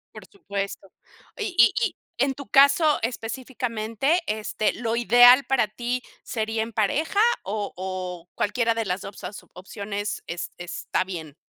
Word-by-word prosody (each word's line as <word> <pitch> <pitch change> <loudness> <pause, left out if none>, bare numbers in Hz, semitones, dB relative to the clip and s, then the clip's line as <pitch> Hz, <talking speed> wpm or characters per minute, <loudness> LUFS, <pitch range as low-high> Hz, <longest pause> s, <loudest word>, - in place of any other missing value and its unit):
Por - - -10
supuesto. 200 - -6 0.5
Y 420 -5 -3
y 235 - +7
y - - -4 0.2
en 270 +2 +2
tu 280 - -9
caso 280 +3 +5
específicamente, 240 - -1
este, 215 0 -1
¿lo 230 -1 -2
ideal 245 +3 +7
para 265 -5 +2
ti 240 +3 -3 0.2
sería 220 -1 -2
en 230 - -7
pareja, 275 - 0 0.2
o 205 +1 -3
o, 180 -2 -5
cualquiera 230 +2 +1
de 225 -1 -2
las 185 +1 -2
2 200 - -9
as 205 - -7
opciones 200 +2 -5
es 170 +1 -5
está 175 +1 -2
bien? 160 -6 -7
225 Hz, 145 wpm, -25 LUFS, 200-250 Hz, 0.5 s, y